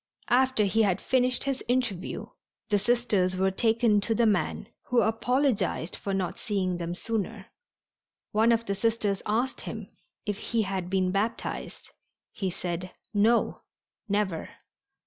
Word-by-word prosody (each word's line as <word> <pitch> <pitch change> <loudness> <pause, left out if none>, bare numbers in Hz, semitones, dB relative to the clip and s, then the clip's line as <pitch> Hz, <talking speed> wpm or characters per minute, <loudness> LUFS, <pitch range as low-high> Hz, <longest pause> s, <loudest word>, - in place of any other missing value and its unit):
After 260 -2 +4
he 220 +3 +2
had 195 -3 +2
finished 255 -1 +3
his 275 -1 -2
interview 235 -7 -1 0.4
the 205 -1 +3
Sisters 205 -5 +2
were 190 +1 +2
taken 225 0 +3
to 225 +3 +1
the 235 - +3
man, 200 -3 +1 0.2
who 245 -1 +3
apologized 225 - +1
for 200 - -4
not 190 -2 -2
seeing 185 -4 -1
them 170 0 -3
sooner. 215 -1 -3 0.8
One 220 +2 +4
of 230 0 +2
the 200 - -1
Sisters 205 -1 0
asked 235 +5 0
him - - -6 0.4
if 205 -1 -2
he 230 -1 0
had 190 -2 -3
been 185 -1 +1
baptized. 210 +4 -3 0.4
He 190 -3 -2
said, 180 0 -4 0.2
"No, 220 +3 +2 0.5
never." 195 -5 0
210 Hz, 140 wpm, -28 LUFS, 190-230 Hz, 0.8 s, After